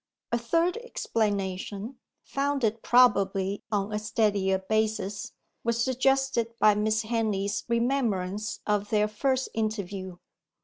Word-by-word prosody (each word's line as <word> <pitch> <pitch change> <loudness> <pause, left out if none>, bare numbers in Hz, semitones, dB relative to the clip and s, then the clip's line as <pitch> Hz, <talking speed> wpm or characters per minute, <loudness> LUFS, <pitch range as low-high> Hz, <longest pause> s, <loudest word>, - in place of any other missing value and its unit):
A 235 - +2
third 330 - +1
explanation, 210 - -2 0.2
founded 275 -6 -1
probably 200 -5 +3
on 205 0 -1
a 210 - 0
steadier 205 -3 +1
basis, 215 0 -1 0.3
was 235 0 +1
suggested 260 -2 +1
by 215 - +6
Miss 215 +2 +1
Henley's 215 -3 -1
remembrance 220 -5 0
of 210 -1 0
their 210 -1 +3
first 260 +5 0
interview. 200 -4 -3
215 Hz, 105 wpm, -27 LUFS, 200-235 Hz, 0.3 s, by